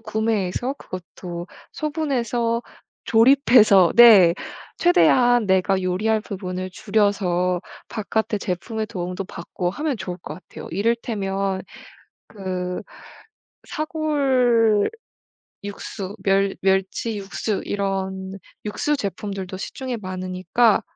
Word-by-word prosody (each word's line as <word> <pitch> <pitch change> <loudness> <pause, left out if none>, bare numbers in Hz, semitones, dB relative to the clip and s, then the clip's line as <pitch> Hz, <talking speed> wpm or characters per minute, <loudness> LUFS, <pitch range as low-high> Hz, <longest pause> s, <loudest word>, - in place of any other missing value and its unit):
구매해서 220 +2 -1
그것도 175 -1 -8 0.3
소분해서 245 -7 -1 0.4
조립해서 225 - +6
네. 205 -8 +9 0.4
최대한 245 - +4
내가 190 0 +2
요리할 210 +5 +1
부분을 185 -3 -5
줄여서 185 -4 +1 0.3
바깥에 220 0 -2
제품의 215 +4 -3
도움도 180 0 -4
받고 175 +1 -4
하면 290 - -2
좋을 180 -3 -6
것 - - -7
같아요. 185 - -11
이를테면 195 -3 -1 0.7
그 185 -3 -4 0.9
사골 260 -9 +2 0.7
육수 200 0 -6
멸 195 0 +2
멸치 195 +3 0
육수 200 +1 -3
이런 190 -1 -3 0.3
육수 290 +8 -1
제품들도 195 -3 -5
시중에 250 +5 -5
많으니까 185 +4 +1
200 Hz, 225 characters per minute, -22 LUFS, 185-235 Hz, 0.9 s, 네